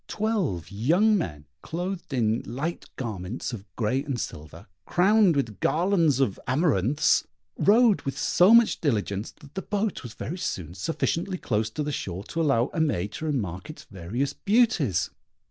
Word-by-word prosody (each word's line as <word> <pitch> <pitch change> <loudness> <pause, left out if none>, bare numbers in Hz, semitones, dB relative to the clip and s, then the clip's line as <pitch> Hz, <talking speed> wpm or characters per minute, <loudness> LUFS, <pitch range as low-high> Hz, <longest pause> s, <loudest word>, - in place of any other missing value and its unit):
Twelve 190 - -1
young 170 - +3
men, 75 - -3 0.2
clothed 175 +1 -5
in 115 -3 +1
light 150 +8 -4
garments 110 -1 -4
of 105 -3 -7
grey 125 +5 0
and 140 -5 -3
silver, 80 -1 -7 0.2
crowned 190 - +4
with 120 -7 -2
garlands 165 -5 +2
of 120 -8 +1
amaranths, 140 - +2 0.3
rowed 220 0 +5
with 135 - -4
so 180 +4 +4
much 235 -1 +5
diligence, 105 - -1
that 145 -2 -17
the 190 - -3
boat 205 0 -2
was 120 -3 -9
very 175 +5 -5
soon 85 - -4
sufficiently 165 - -2
close 110 -7 -1
to 150 +7 -3
the 150 - -2
shore 95 -8 -4
to 165 - -1
allow 135 -6 +2
Aimée 125 - 0
to 155 - -6
remark 105 - -3
its 155 - -9
various 115 +8 -3
beauties. 200 - +2
140 Hz, 155 wpm, -26 LUFS, 105-175 Hz, 0.3 s, rowed